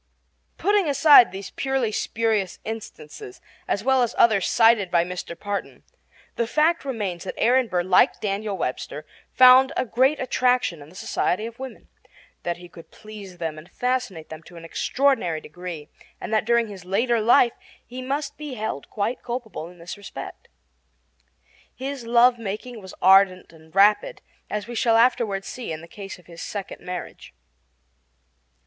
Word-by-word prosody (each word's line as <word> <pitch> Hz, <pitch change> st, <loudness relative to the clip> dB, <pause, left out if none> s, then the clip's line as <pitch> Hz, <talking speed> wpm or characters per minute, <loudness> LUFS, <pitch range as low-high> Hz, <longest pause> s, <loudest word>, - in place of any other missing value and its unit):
Putting 405 Hz, -5 st, +2 dB
aside 285 Hz, -3 st, +7 dB
these 195 Hz, +1 st, -8 dB
purely 265 Hz, -4 st, -1 dB
spurious 215 Hz, -3 st, -1 dB
instances, 205 Hz, -, -8 dB, 0.3 s
as 200 Hz, -, -1 dB
well 265 Hz, +1 st, +3 dB
as 240 Hz, -1 st, 0 dB
others 215 Hz, -5 st, +4 dB
cited 225 Hz, -4 st, +4 dB
by 170 Hz, -1 st, +3 dB
Mr. 175 Hz, -1 st, -7 dB
Parton, 205 Hz, -1 st, -5 dB, 0.5 s
the 235 Hz, -, 0 dB
fact 310 Hz, +6 st, +2 dB
remains 205 Hz, -10 st, -4 dB
that -, -, -6 dB
Aaron 250 Hz, +1 st, +3 dB
Burr, 180 Hz, -4 st, 0 dB
like 185 Hz, 0 st, +3 dB
Daniel 205 Hz, 0 st, -2 dB
Webster, 150 Hz, +1 st, -4 dB, 0.3 s
found 255 Hz, +1 st, +7 dB
a 255 Hz, -, +1 dB
great 260 Hz, +6 st, +2 dB
attraction 250 Hz, -, +1 dB
in 145 Hz, -, -13 dB
the 180 Hz, -, -18 dB
society 185 Hz, +2 st, -1 dB
of 230 Hz, +1 st, -9 dB
women; 265 Hz, -1 st, -9 dB, 0.5 s
that 175 Hz, -1 st, -3 dB
he 175 Hz, 0 st, -12 dB
could 170 Hz, -1 st, -15 dB
please 210 Hz, -4 st, -11 dB
them 160 Hz, -2 st, -4 dB
and 160 Hz, +4 st, -15 dB
fascinate 245 Hz, -9 st, -2 dB
them 160 Hz, 0 st, -9 dB
to 175 Hz, +2 st, -16 dB
an 165 Hz, -, -10 dB
extraordinary 250 Hz, -, 0 dB
degree; 165 Hz, -1 st, -8 dB, 0.3 s
and -, -, -5 dB
that 215 Hz, -, +2 dB
during 235 Hz, 0 st, +2 dB
his 195 Hz, -4 st, -10 dB
later 225 Hz, +5 st, +1 dB
life 240 Hz, +2 st, +5 dB, 0.3 s
he 250 Hz, +2 st, -8 dB
must 280 Hz, +3 st, -4 dB
be 295 Hz, -4 st, -6 dB
held 215 Hz, -, -5 dB
quite 220 Hz, +4 st, -2 dB
culpable 235 Hz, -9 st, -5 dB
in 180 Hz, -, -16 dB
this 170 Hz, +3 st, -8 dB
respect. 200 Hz, -, -9 dB, 1.3 s
His 265 Hz, -2 st, -6 dB
love 240 Hz, +1 st, +5 dB
making 225 Hz, +2 st, -6 dB
was 190 Hz, -1 st, -11 dB
ardent 190 Hz, -1 st, +5 dB
and 160 Hz, +1 st, -19 dB
rapid, 210 Hz, -, +3 dB, 0.3 s
as 210 Hz, -1 st, -3 dB
we 240 Hz, -, -8 dB
shall 230 Hz, -1 st, +3 dB
afterward 230 Hz, -5 st, +2 dB
see 250 Hz, -8 st, -6 dB
in 160 Hz, 0 st, -5 dB
the 170 Hz, -, -12 dB
case 195 Hz, +2 st, -9 dB
of 180 Hz, -, -20 dB
his 170 Hz, -1 st, -11 dB
second 200 Hz, -2 st, -6 dB
marriage. 180 Hz, -, -8 dB
215 Hz, 165 wpm, -24 LUFS, 180-250 Hz, 1.3 s, aside